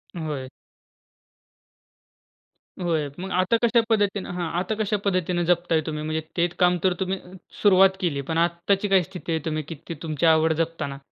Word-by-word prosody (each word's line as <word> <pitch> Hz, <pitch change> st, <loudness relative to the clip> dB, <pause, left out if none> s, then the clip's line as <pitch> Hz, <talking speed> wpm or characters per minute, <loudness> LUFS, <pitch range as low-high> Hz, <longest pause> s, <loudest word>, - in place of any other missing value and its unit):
होय. 150 Hz, -6 st, -4 dB, 2.3 s
होय, 160 Hz, -4 st, 0 dB
मग 190 Hz, +1 st, -5 dB
आता 185 Hz, +5 st, +2 dB
कशा 235 Hz, 0 st, +4 dB
पद्धतीने 205 Hz, -3 st, +1 dB
हां 175 Hz, -2 st, -2 dB
आता 190 Hz, +4 st, -2 dB
कशा 210 Hz, 0 st, 0 dB
पद्धतीनं 180 Hz, -2 st, +1 dB
जपताय 175 Hz, -2 st, +2 dB
तुम्ही? 150 Hz, -1 st, -4 dB
म्हणजे 155 Hz, +1 st, -2 dB, 0.2 s
ते 170 Hz, +1 st, +3 dB
काम 180 Hz, 0 st, +4 dB
तर 185 Hz, -, +3 dB
तुम्ही 190 Hz, 0 st, -1 dB, 0.4 s
सुरुवात 190 Hz, -1 st, +5 dB
केली 150 Hz, -6 st, 0 dB
पण 160 Hz, -, 0 dB
आत्ताची 175 Hz, +4 st, +1 dB
काय 195 Hz, -2 st, +4 dB
स्थिती 180 Hz, -1 st, -7 dB
आहे 160 Hz, -, +1 dB
तुम्ही 155 Hz, -1 st, -2 dB
की 165 Hz, -, -5 dB
ती -, -, -4 dB
तुमची 155 Hz, 0 st, -1 dB
आवड 160 Hz, 0 st, +2 dB
जपताना? 155 Hz, -4 st, -5 dB
175 Hz, 160 wpm, -24 LUFS, 160-190 Hz, 2.3 s, सुरुवात